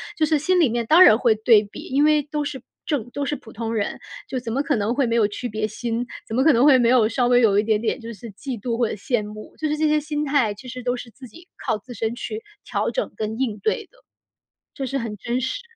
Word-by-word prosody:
就 315 - +2
是 305 0 +2
心 365 +6 +2
里 300 - +4
面 235 +1 -1
当 325 +10 +7
然 215 - +7
会 235 -2 +3
对 220 0 +5
比， 205 - -10
因 280 +3 +1
为 305 -1 +4
都 295 +1 -3
是 280 -3 -5 0.2
正 255 -6 -2
都 285 +2 -3
是 295 - -1
普 250 -5 -13
通 225 +1 -4
人， 210 -3 -2 0.3
就 260 - -2
怎 230 -2 -5
么 275 +3 0
可 285 -3 +1
能 215 +3 0
会 275 - +2
没 230 0 +1
有 215 -3 +4
区 240 +4 -5
别 215 0 -2
心？ 235 +2 -3 0.2
怎 - - -8
么 260 +4 +2
可 315 - +7
能 235 +1 +4
会 280 -2 +7
没 240 - +3
有 235 -3 +4
稍 240 +1 +1
微 245 0 +5
有 205 -3 +4
一 - - +2
点 215 -1 +1
点 235 +3 -1
就 230 -1 -8
是 220 +2 -10
嫉 255 +5 -6
妒 230 +2 -3
或 240 -1 +2
者 - - -4
羡 220 +3 -1
慕？ 210 +1 -9
就 310 - -1
是 300 0 -1
这 310 - +1
些 305 0 +3
心 300 0 -3
态 275 -7 +1
其 245 +5 -11
实 250 +1 -7
都 245 0 -1
是 245 -1 -8
自 255 +3 -13
己 335 +10 -15
靠 - - -1
自 245 +4 -11
身 225 +1 -2
去 220 -2 -5 0.2
调 - - -1
整 - - -2
跟 220 +1 -3
应 235 -5 -2
对 440 - -1
的。 - - -25 0.8
这 275 - -4
是 270 +1 -2
很 230 -4 -4
真 235 +5 -2
实。 - - -3
245 Hz, 300 characters per minute, -23 LUFS, 220-280 Hz, 0.8 s, 当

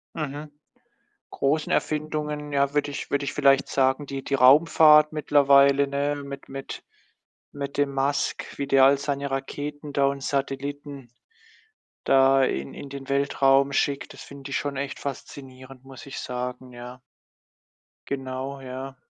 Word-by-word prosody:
Mhm. 150 0 -5 0.8
Großen 150 +3 -1
Erfindungen, 150 -1 -2
ja, 140 0 +1
würde 145 0 0
ich 140 - -6
würde 140 0 0
ich - - -3
vielleicht 140 -1 +3
sagen, 135 +1 +1
die 135 0 -6
die 140 - -3
Raumfahrt 150 +3 +6
mittlerweile, 140 -1 +4
ne? 145 +1 -1
Mit 140 0 -9
mit 135 0 -8 0.7
mit 140 -1 -6
dem 140 -1 0
Musk, 140 +1 -2
wie 140 - -2
der 135 -1 +5
all 140 +1 +5
seine 140 -1 -3
Raketen 145 +2 -5
da 140 -1 +2
und 140 0 -2
Satelliten 140 -1 -4 0.9
da 135 0 +4
in 70 - -3
in 140 - -9
den 140 -1 -9
Weltraum 140 0 +2
schickt. 140 -1 -1
Das - - -11
finde 140 0 -11
ich 130 - 0
schon 145 -1 -4
echt 140 +1 -4
faszinierend, 135 -2 -9
muss 135 -1 -12
ich 135 - -7
sagen, 125 0 -6
ja. 125 +1 -10 1.1
Genau, 135 0 -5
ja. 130 +1 -7
140 Hz, 145 wpm, -25 LUFS, 135-145 Hz, 1.1 s, Raumfahrt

